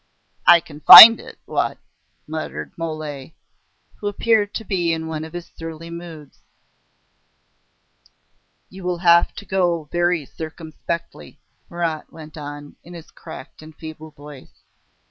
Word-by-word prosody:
"I 170 -1 +7
can 150 -2 -14
find 225 +8 +11
it, - - -13
what?" - - -3 0.5
muttered 155 - -7
Mole, 155 -3 -7 0.7
who 205 - -5
appeared 205 0 0
to 225 - -6
be 175 -4 -1
in 160 0 -5
one 160 -1 -6
of 160 +1 -11
his 175 -1 -9
surly 165 0 -9
moods. 170 -3 -11 2.3
"You 190 0 -13
will 180 -1 -3
have 170 0 +4
to 205 - -10
go 175 -4 -1
very 175 -3 -1
circumspectly," 160 - -8 0.3
Marat 165 -3 -5
went 155 -1 -13
on, 145 -1 -10
in 175 +1 -13
his 165 -2 -13
cracked - - -13
and 155 0 -15
feeble 160 0 -11
voice. 145 -2 -16
165 Hz, 130 wpm, -20 LUFS, 155-175 Hz, 2.3 s, find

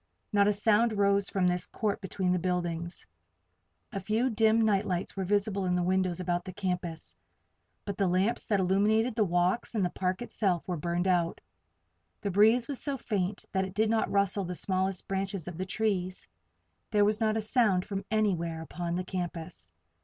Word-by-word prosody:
Not 200 0 +4
a - - +5
sound 215 +2 +3
rose 200 -1 +2
from 190 -2 0
this 180 0 +1
court 215 -1 -2
between 190 -1 -1
the 180 - +2
buildings. 175 -1 -2 0.9
A 195 - -3
few 220 +7 0
dim 220 0 +3
night 210 -3 +3
lights 180 0 -2
were 195 - -2
visible 200 +1 0
in 180 -1 +1
the 180 - +1
windows 185 -1 +1
about 175 -1 -1
the 185 0 -8
campus; 180 -4 -4 0.7
but 200 -2 -5
the 195 - +3
lamps 185 +6 +1
that 205 -3 +1
illumined 210 +5 +2
the 225 - +3
walks 180 +5 0
and 200 -4 +2
the 175 - -2
park 185 +4 -2
itself 190 -7 -1
were 180 - -1
burned 175 +3 -1
out. 175 -2 +1 0.8
The 200 - -2
breeze 220 +5 +4
was 280 -3 -2
so 280 -2 -1
faint 200 -4 -2
that 190 -1 +1
it 190 0 -6
did 220 +1 +2
not 225 - +1
rustle 200 0 +2
the 180 0 -4
smallest 190 0 0
branches 195 -3 -3
of 175 -1 -7
the 185 - -3
trees. 185 -2 -2 0.6
There 205 -1 +3
was 215 +2 +1
not 220 0 +2
a - - 0
sound 210 -5 +2
from 195 -1 -4
anywhere 170 -7 0
upon 170 +1 -4
the 180 +1 -2
campus. 165 - -6
190 Hz, 190 wpm, -29 LUFS, 180-210 Hz, 0.9 s, a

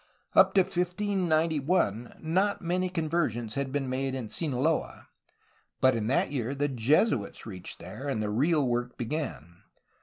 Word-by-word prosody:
Up - - +6
to 195 - +7
1591 175 - 0
not 190 +6 +1
many 180 +1 -1
conversions 155 - -1
had 140 +1 -2
been 140 -1 -1
made 130 +1 -1
in 120 -5 -5
Sinaloa, 150 +2 -1 0.7
but 130 -1 +4
in 110 -2 -1
that 130 - +2
year 130 -1 -2
the 145 +1 +1
Jesuits 130 - +1
reached 95 -5 -7
there, 105 +11 -8
and 130 - -1
the 105 -1 -1
real 145 +5 +2
work 120 0 -2
began. 115 - -4
140 Hz, 145 wpm, -28 LUFS, 120-170 Hz, 0.7 s, to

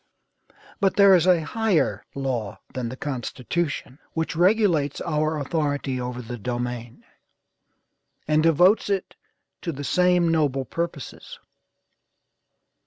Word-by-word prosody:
"But 195 -3 +2
there 200 -1 +7
is 180 -1 +4
a 180 -3 +5
higher 220 -6 0
law 125 -7 -3
than 125 -3 -3
the 130 - -7
Constitution, 140 +2 -3
which 160 0 -2
regulates 175 -6 +2
our 155 -1 0
authority 145 -3 -1
over 125 0 -5
the 120 +1 -7
domain, 120 0 -4 1.2
and 155 0 +3
devotes 175 +7 +4
it 195 -2 -2 0.5
to 170 - -3
the 145 -1 -7
same 180 +1 +3
noble 145 -5 +1
purposes. 165 0 -5
150 Hz, 110 wpm, -24 LUFS, 130-175 Hz, 1.2 s, there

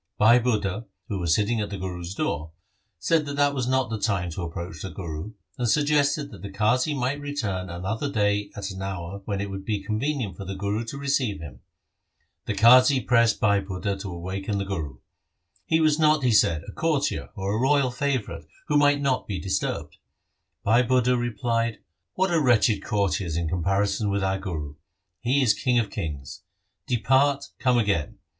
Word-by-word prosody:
Bhai 115 +3 +6
Budha, 110 -3 -1 0.2
who 100 - -2
Was 85 -2 +2
sitting 110 +2 +1
at 105 - -3
the 100 - -5
Guru's 90 -1 -5
door, 80 - -2 0.4
said 155 - +1
that 145 - -4
that 145 0 +3
was 130 -3 -2
not 130 -3 +1
the 110 - -2
time 95 -5 0
to 85 - -5
approach 85 +1 -6
the 95 - -5
Guru, 85 +2 -6 0.3
and 120 -2 +1
suggested 145 +1 +2
that - - -11
the 100 - -6
Qazi 125 +9 +1
might 135 +4 -1
return 110 -11 -3
another 95 +11 -3
day 105 -2 +1
at 100 0 -4
an 95 0 -7
hour 95 0 -5
when 100 -2 -2
it 100 0 -3
would 95 0 -6
be 105 -1 -2
convenient 110 - -2
for - - -6
the 95 0 -5
Guru 100 +3 -2
to 125 +5 -6
receive 140 - 0
him. 70 -7 -9 0.9
The - - -1
Qazi 130 +3 +6
pressed 115 -3 +3
Bhai 100 -2 +3
Budha 95 +1 -3
to 100 -3 -5
awaken 95 +4 -4
the 100 - -2
Guru. 80 -10 -4 0.7
He 160 - +3
was 155 -1 +3
not, 155 -2 +4
he 125 - +3
said, 80 -7 +3
a - - -6
courtier 150 +2 -1
or 100 +2 -1
royal 135 -1 +3
favourite 125 - -2 0.2
who 150 - +4
might 145 0 +4
not 135 -3 0
be 100 -3 -3
disturbed. 95 0 -3 0.7
Bhai 115 +4 +4
Budha 125 0 +2
replied, 115 -1 -1 0.2
' 90 +1 -55
What 190 0 +1
are 165 -2 +3
wretched 110 -5 +3
courtiers 95 -5 0
in 85 -1 -1
comparison 95 +5 0
with 100 0 0
our 95 0 0
Guru? 80 -7 -5 0.5
He 130 +4 +2
is 115 - +5
king 125 -1 +1
of 110 -4 0
kings. 70 -7 -5 0.5
Depart, 135 +4 +2
come 125 -2 +3
again. 100 -10 0
105 Hz, 185 wpm, -25 LUFS, 95-130 Hz, 0.9 s, Bhai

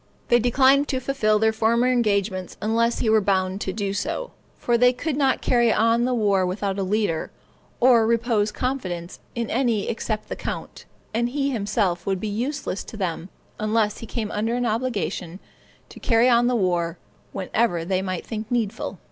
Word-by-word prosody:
They 240 - +5
declined 265 +4 +4
to 260 - -1
fulfil 240 -5 +1
their 220 +1 +2
former 230 +2 +2
engagements 200 -6 0
unless 230 +2 +1
he 225 - 0
were 220 -1 +5
bound 190 0 0
to 190 - -2
do 200 -1 -2
so; - - -3 0.3
for 240 - +1
they 250 +1 +5
could 295 +3 -3
not 270 -2 +1
carry 240 -2 +3
on 230 +2 +3
the 255 - 0
war 200 -4 +2
without 195 +2 -2
a - - 0
leader, 190 -4 -1 0.5
or 235 -3 +5
repose 230 -2 +1
confidence 185 -10 -4 0.2
in 235 -1 -3
any 235 -4 +1
except 220 -1 -3
the - - -4
count; - - -6 0.3
and 235 +2 +1
he 280 +1 -1
himself 200 -6 -1
would 195 -1 0
be 215 - -3
useless 235 0 -3
to 220 - -9
them, 180 -2 -3 0.3
unless 215 0 0
he 230 - -8
came 220 -2 -3
under 225 +3 -1
an 245 0 -1
obligation 215 -6 -2 0.5
to - - -12
carry 230 0 +3
on 240 -1 +4
the 250 - +1
war 175 -5 0 0.3
whenever 190 -3 0
they 185 +1 0
might 185 -2 -4
think 220 -1 -5
needful." 230 -3 -2
220 Hz, 180 wpm, -23 LUFS, 195-240 Hz, 0.5 s, They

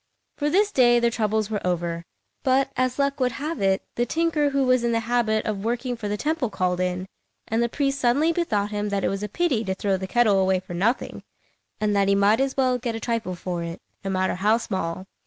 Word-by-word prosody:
For 295 0 0
this 410 +6 +3
day 240 -5 +5
their 235 0 +2
troubles 220 -2 0
were 210 - -1
over; 170 -1 -2 0.4
but, 265 +1 +2
as 255 0 0
luck 280 0 0
would 250 -2 +1
have 300 +4 -4
it, 195 0 +2
the 240 - 0
tinker 320 0 +1
who 275 -1 +1
was 255 -1 +3
in 235 0 +1
the 230 - +1
habit 225 -2 +1
of 205 -2 -2
working 245 +2 -1
for 225 -3 -5
the 205 0 -2
temple 300 -1 -1
called 180 -3 -1
in, 180 0 -1 0.4
and 225 +1 0
the 235 - +1
priest 275 +1 -1
suddenly 280 +7 +3
bethought 215 -12 -1
him 210 0 -2
that 200 -1 -1
it - - +2
was 195 0 -3
a 210 - -3
pity 275 - 0
to 190 -2 -2
throw 195 0 0
the 190 0 -5
kettle 215 -2 +3
away 190 0 +2
for 180 - -9
nothing, 215 +9 -1 0.6
and 210 -1 +1
that 200 -1 +3
he 200 - +4
might 200 +3 +4
as 270 0 -1
well 255 -2 +2
get 235 -2 -3
a - - -4
trifle 225 -5 -2
for 175 -1 -4
it, 170 +1 -5 0.2
no 195 - -3
matter 185 0 0
how 210 +5 +2
small. 185 -5 -3
225 Hz, 235 wpm, -24 LUFS, 195-255 Hz, 0.6 s, day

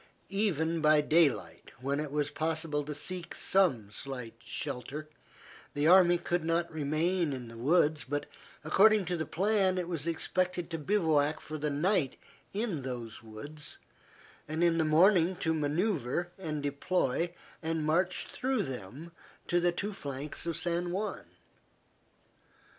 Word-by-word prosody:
Even 170 -5 0
by 155 0 +6
daylight, 145 - +2
when 140 +3 -1
it 150 -1 -2
was 145 0 0
possible 160 -2 -1
to 150 +1 -5
seek 180 +3 -5
some 130 - +2
slight 125 -1 -6
shelter, 140 +4 -5 0.7
the 145 +1 +1
army 175 0 +7
could 175 0 -1
not 165 0 0
remain 160 +2 0
in 125 -3 -6
the 115 - -11
woods, 150 +4 +2
but 145 0 -1 0.4
according 205 +6 +5
to 180 - -1
the 160 -3 -3
plan 190 0 +2
it 180 -2 -1
was 165 -3 -3
expected 175 +1 -1
to 165 - -2
bivouac 155 -4 +2
for 155 0 -7
the 150 +1 0
night 150 0 +1 0.3
in 200 -7 -2
those 120 -4 -6
woods, 115 +8 -8 0.7
and 155 +2 -1
in 170 -1 +3
the - - +4
morning 175 +3 +5
to 160 -2 0
manoeuvre 160 - 0
and 155 -5 -3
deploy 145 +2 0 0.3
and 160 -1 -1
march 180 +4 +1
through 255 -4 -1
them 135 - -7 0.3
to 175 - +2
the 175 0 +3
two 205 +4 -3
flanks 145 -1 -5
of 165 - -1
San 175 0 -1
Juan. 200 +4 -3
160 Hz, 145 wpm, -31 LUFS, 145-175 Hz, 0.7 s, army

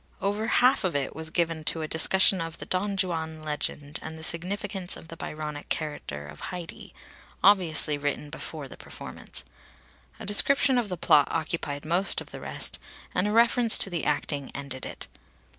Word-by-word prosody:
Over 205 +3 -1
half 250 +3 +4
of 180 -5 0
it 140 -2 -1
was 160 0 -3
given 165 -2 0
to 160 0 -1
a - - -3
discussion 190 +3 +4
of 165 0 -5
the - - -7
Don 195 +2 -1
Juan 160 -4 -2
legend 150 -1 -3
and 160 0 -7
the 160 - -10
significance 180 +2 -1
of 165 - -14
the 165 - -8
Byronic 150 -2 -6
character 145 - -3
of - - -12
Haidee 180 -2 -7 0.5
obviously 165 -6 +5
written 145 +1 -3
before 155 -2 -6
the - - -12
performance. - - -8 0.7
A - - -7
description 260 +5 +4
of 225 -4 -2
the 180 - -3
plot 150 -3 +5
occupied 155 -3 -3
most 175 +5 +1
of - - -10
the - - -7
rest, - - +2 0.3
and 180 +3 +2
a - - 0
reference 230 +1 +5
to 195 - +4
the 170 - -2
acting 140 -3 -1
ended 135 -2 -5
it. - - -7
165 Hz, 175 wpm, -27 LUFS, 150-190 Hz, 0.7 s, obviously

